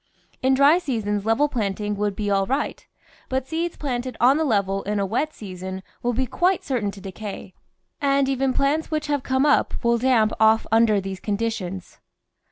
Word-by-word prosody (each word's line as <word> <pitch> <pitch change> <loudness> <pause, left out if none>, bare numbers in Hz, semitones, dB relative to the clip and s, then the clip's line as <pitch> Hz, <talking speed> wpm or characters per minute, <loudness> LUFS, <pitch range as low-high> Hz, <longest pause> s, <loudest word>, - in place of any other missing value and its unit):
In 265 +1 +3
dry 285 +6 +5
seasons 215 - -2
level 255 +7 +3
planting 210 -5 -2
would 205 -1 -1
be 205 -1 -2
all 195 -1 +2
right, 275 +3 -2 0.4
but 260 0 -2
seeds 330 +2 -3
planted 250 -3 -3
on 260 +4 +5
the 320 - +1
level 200 -7 +1
in 205 +1 -2
a 200 - +1
wet 250 +10 -1
season 190 -4 -7 0.2
will 245 - 0
be 260 +3 0
quite 360 +8 +1
certain 240 -7 -1
to 200 - -9
decay, 195 0 -8 0.5
and 275 -1 +2
even 270 0 +1
plants 280 +4 0
which 305 -1 -2
have 290 -2 0
come 260 +2 +1
up 295 - +3
will 235 0 +3
damp 230 -4 +3
off 220 0 +4
under 225 -2 +4
these 190 -1 -5
conditions. 200 -4 -4
230 Hz, 180 wpm, -23 LUFS, 205-275 Hz, 0.5 s, dry